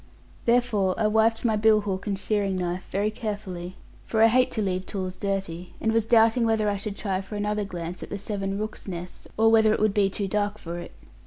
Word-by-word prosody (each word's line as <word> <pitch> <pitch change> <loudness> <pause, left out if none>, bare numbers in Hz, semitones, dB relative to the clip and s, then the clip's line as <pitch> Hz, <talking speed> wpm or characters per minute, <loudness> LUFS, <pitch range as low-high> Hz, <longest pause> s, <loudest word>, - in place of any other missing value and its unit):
Therefore 230 -6 +2
I 220 - +2
wiped 220 +2 +2
my 220 -2 +3
bill 215 0 +4
hook 195 -2 -4
and 200 -1 -1
shearing 200 -1 0
knife 180 0 -3
very 205 +3 0
carefully, 200 -5 -5 0.3
for 220 0 +2
I 225 - +7
hate 255 +2 +4
to 220 - -1
leave 185 -1 -2
tools 185 -2 -4
dirty; 190 -4 -4
and 220 - +1
was 225 -1 +1
doubting 230 +1 +5
whether 220 -2 +2
I 205 -1 +1
should 200 +1 -5
try 195 -3 -2
for 195 +2 -8
another 210 0 -1
glance 175 -2 -6
at - - -7
the 200 - -4
seven 195 -1 -3
rooks' 215 0 -5
nests, 180 -1 -7
or 225 +1 +5
whether 220 -1 +5
it - - -3
would 215 -1 +2
be 200 -1 +3
too 195 0 -3
dark 205 +1 -1
for 170 -4 -6
it. 175 - -9
205 Hz, 225 wpm, -26 LUFS, 190-220 Hz, 0.3 s, I